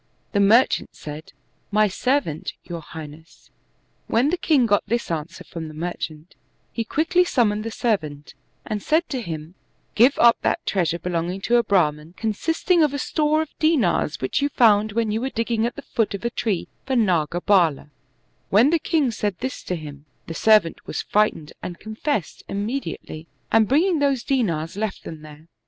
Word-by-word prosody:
The 200 Hz, -, +1 dB
merchant 220 Hz, +6 st, +3 dB
said, 150 Hz, +1 st, -9 dB, 0.4 s
"My 215 Hz, +1 st, +3 dB
servant, 205 Hz, -, -1 dB
your 170 Hz, -1 st, -6 dB
high 160 Hz, 0 st, -8 dB
ness." 155 Hz, +2 st, -16 dB, 0.6 s
When 250 Hz, +6 st, +2 dB
the 360 Hz, -, 0 dB
king 290 Hz, -8 st, +3 dB
got 205 Hz, -2 st, +2 dB
this 235 Hz, -2 st, -1 dB
answer 160 Hz, +1 st, -4 dB
from 165 Hz, -2 st, -7 dB
the 155 Hz, -, -10 dB
merchant, 160 Hz, -1 st, -5 dB, 0.4 s
he 230 Hz, -, -2 dB
quickly 330 Hz, +9 st, +2 dB
summoned 215 Hz, -10 st, +1 dB
the 225 Hz, -, -3 dB
servant 155 Hz, -12 st, -2 dB, 0.3 s
and 210 Hz, -2 st, -3 dB
said 320 Hz, -, +1 dB
to 260 Hz, -3 st, -3 dB
him, 160 Hz, -4 st, -6 dB, 0.2 s
" -, -, -43 dB
Give 250 Hz, +6 st, +5 dB
up 235 Hz, -1 st, +6 dB
that -, -, 0 dB
treasure 170 Hz, -3 st, 0 dB
belonging 175 Hz, +1 st, -2 dB
to 240 Hz, +4 st, +3 dB
a 235 Hz, -, +3 dB
Brahman, 165 Hz, -5 st, +1 dB
consisting 325 Hz, -, +1 dB
of 295 Hz, -2 st, +2 dB
a -, -, -1 dB
store 305 Hz, +2 st, +1 dB
of 315 Hz, -, -11 dB
dindrs, 260 Hz, -, +2 dB
which 130 Hz, -, 0 dB
you 285 Hz, -, +1 dB
found 215 Hz, -5 st, +4 dB
when 225 Hz, -1 st, 0 dB
you 220 Hz, +2 st, -1 dB
were 265 Hz, -, -1 dB
digging 230 Hz, -1 st, 0 dB
at 240 Hz, -, -6 dB
the -, -, -8 dB
foot 220 Hz, -3 st, -1 dB
of 200 Hz, -, -7 dB
a 235 Hz, -, 0 dB
tree 210 Hz, -7 st, -2 dB, 0.2 s
for 265 Hz, -, -2 dB
ndgabald" 175 Hz, -, +2 dB, 0.6 s
When 230 Hz, +9 st, +5 dB
the 335 Hz, -, +3 dB
king 300 Hz, -6 st, +1 dB
said 205 Hz, -4 st, -2 dB
this 260 Hz, +2 st, -4 dB
to 180 Hz, -, -2 dB
him, 145 Hz, -3 st, -9 dB, 0.2 s
the 165 Hz, -, -6 dB
servant 210 Hz, -2 st, +3 dB
was -, -, -3 dB
frightened 210 Hz, -8 st, 0 dB
and 175 Hz, -1 st, -6 dB
confessed 220 Hz, -, -3 dB
imme 215 Hz, +8 st, -2 dB
diately, 155 Hz, +1 st, -8 dB, 0.2 s
and 225 Hz, -1 st, +4 dB
bringing 325 Hz, -, +3 dB
those 275 Hz, -4 st, +1 dB
dinars 175 Hz, -, -1 dB
left 210 Hz, -1 st, -3 dB
them 160 Hz, -2 st, -8 dB
there. 155 Hz, +1 st, -13 dB
210 Hz, 180 wpm, -23 LUFS, 165-250 Hz, 0.6 s, up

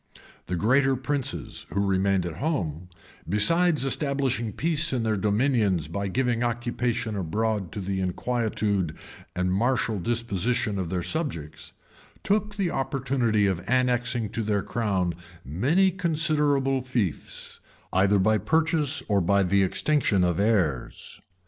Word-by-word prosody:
The 90 Hz, -, -2 dB
greater 135 Hz, +8 st, +3 dB
princes, 140 Hz, +1 st, -4 dB
who 100 Hz, +1 st, 0 dB
remained 95 Hz, -1 st, +1 dB
at 85 Hz, -2 st, -5 dB
home, 90 Hz, -, -2 dB, 0.4 s
besides 155 Hz, -, +3 dB
establishing 135 Hz, -5 st, -1 dB
peace 160 Hz, -, 0 dB
in 125 Hz, -3 st, 0 dB
their 110 Hz, -1 st, +1 dB
dominions 105 Hz, -, +1 dB
by 100 Hz, +5 st, -3 dB
giving 120 Hz, +3 st, 0 dB
occupation 120 Hz, -1 st, -1 dB
abroad 100 Hz, +2 st, -1 dB
to -, -, -4 dB
the 95 Hz, 0 st, -2 dB
inquietude 100 Hz, -3 st, -1 dB, 0.4 s
and 90 Hz, 0 st, 0 dB
martial 115 Hz, 0 st, +1 dB
disposition 115 Hz, 0 st, -1 dB
of 90 Hz, -3 st, -3 dB
their 90 Hz, -1 st, -2 dB
subjects, 105 Hz, -, -4 dB, 0.5 s
took 210 Hz, +1 st, 0 dB
the 195 Hz, -5 st, -1 dB
opportunity 130 Hz, -6 st, 0 dB
of 95 Hz, -3 st, -1 dB
annexing 125 Hz, -2 st, +1 dB
to 115 Hz, -, -3 dB
their 105 Hz, -2 st, 0 dB
crown 95 Hz, -7 st, -1 dB, 0.3 s
many 145 Hz, -, +2 dB
considerable 150 Hz, -6 st, +1 dB
fiefs, 120 Hz, -, -3 dB, 0.3 s
either 100 Hz, +2 st, +4 dB
by 110 Hz, +3 st, +3 dB
purchase 160 Hz, -, +1 dB
or 100 Hz, -2 st, +2 dB
by 100 Hz, +3 st, +3 dB
the 100 Hz, +2 st, +2 dB
extinction 100 Hz, 0 st, +2 dB
of 90 Hz, -1 st, +1 dB
heirs. 95 Hz, -, -1 dB
115 Hz, 130 wpm, -26 LUFS, 95-135 Hz, 0.5 s, either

